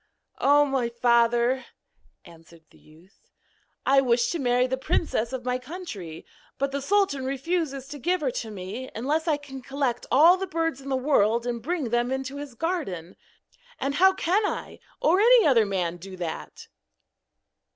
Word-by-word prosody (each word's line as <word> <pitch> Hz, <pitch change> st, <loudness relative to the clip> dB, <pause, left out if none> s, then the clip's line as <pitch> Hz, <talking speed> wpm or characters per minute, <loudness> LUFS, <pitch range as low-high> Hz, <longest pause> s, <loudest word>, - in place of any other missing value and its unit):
'O, 290 Hz, +1 st, +5 dB
my 265 Hz, -4 st, -1 dB
father,' 235 Hz, +1 st, +2 dB, 0.6 s
answered 165 Hz, 0 st, -17 dB
the -, -, -21 dB
youth, 165 Hz, +6 st, -22 dB, 0.6 s
'I 270 Hz, +1 st, +5 dB
wish 240 Hz, -2 st, +2 dB
to 340 Hz, -, -2 dB
marry 250 Hz, -1 st, +2 dB
the 260 Hz, +1 st, -1 dB
princess 260 Hz, -4 st, -1 dB
of 255 Hz, -2 st, -5 dB
my 250 Hz, 0 st, -1 dB
country; 250 Hz, -, -8 dB, 0.3 s
but 275 Hz, 0 st, -1 dB
the 280 Hz, 0 st, -3 dB
sultan 375 Hz, -4 st, +1 dB
refuses 275 Hz, 0 st, -2 dB
to 290 Hz, +1 st, -8 dB
give 355 Hz, +5 st, 0 dB
her 270 Hz, -4 st, 0 dB
to 230 Hz, -, -5 dB
me 210 Hz, +6 st, -7 dB
unless 300 Hz, +8 st, -1 dB
I 305 Hz, -3 st, +2 dB
can 270 Hz, -2 st, -10 dB
collect 270 Hz, -1 st, -2 dB
all 330 Hz, +7 st, +7 dB
the 385 Hz, 0 st, -4 dB
birds 325 Hz, -5 st, -2 dB
in 275 Hz, -, -8 dB
the 265 Hz, -, +1 dB
world 235 Hz, -4 st, +2 dB
and 240 Hz, -1 st, -3 dB
bring 305 Hz, -1 st, -2 dB
them 240 Hz, +2 st, 0 dB
into 265 Hz, +1 st, -3 dB
his 285 Hz, -4 st, -8 dB
garden. 230 Hz, -, -3 dB, 0.6 s
And 275 Hz, -, -1 dB
how 380 Hz, +5 st, +5 dB
can 380 Hz, +3 st, +1 dB
I, 410 Hz, -, -4 dB, 0.2 s
or 350 Hz, +5 st, +3 dB
any 475 Hz, +2 st, +6 dB
other 235 Hz, -7 st, +4 dB
man, 180 Hz, -3 st, -2 dB
do 185 Hz, +2 st, -10 dB
that?' 170 Hz, -3 st, -6 dB
265 Hz, 170 wpm, -26 LUFS, 235-305 Hz, 0.6 s, all